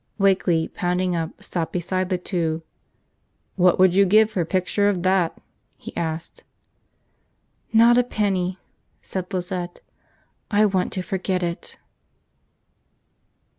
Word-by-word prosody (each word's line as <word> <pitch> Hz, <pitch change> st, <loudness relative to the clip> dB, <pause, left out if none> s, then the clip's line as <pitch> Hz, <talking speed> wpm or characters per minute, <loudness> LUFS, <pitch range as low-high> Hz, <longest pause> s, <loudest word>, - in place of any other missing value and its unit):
Wakeley, 190 Hz, -5 st, +2 dB
pounding 180 Hz, 0 st, -1 dB
up, 165 Hz, -1 st, -4 dB
stopped 165 Hz, -3 st, -3 dB
beside 185 Hz, +1 st, -2 dB
the 185 Hz, -, +1 dB
two. 165 Hz, -3 st, -2 dB, 0.9 s
"What 180 Hz, -2 st, +4 dB
would 185 Hz, -1 st, +5 dB
you 200 Hz, +2 st, +5 dB
give 215 Hz, +3 st, +4 dB
for 185 Hz, -, -1 dB
a 165 Hz, -, -2 dB
picture 195 Hz, +3 st, +1 dB
of 185 Hz, -4 st, -1 dB
that?" 185 Hz, -3 st, +1 dB, 0.4 s
he -, -, -10 dB
asked. 160 Hz, -1 st, -4 dB, 1.3 s
"Not 235 Hz, +2 st, +6 dB
a -, -, +4 dB
penny," 190 Hz, -6 st, -1 dB, 0.5 s
said 185 Hz, -1 st, -5 dB
Lizette. 180 Hz, -1 st, -4 dB, 0.7 s
"I 210 Hz, 0 st, +4 dB
want 190 Hz, -3 st, 0 dB
to 185 Hz, -, -2 dB
forget 185 Hz, -1 st, -2 dB
it." 170 Hz, 0 st, -4 dB
185 Hz, 125 wpm, -23 LUFS, 175-195 Hz, 1.3 s, Not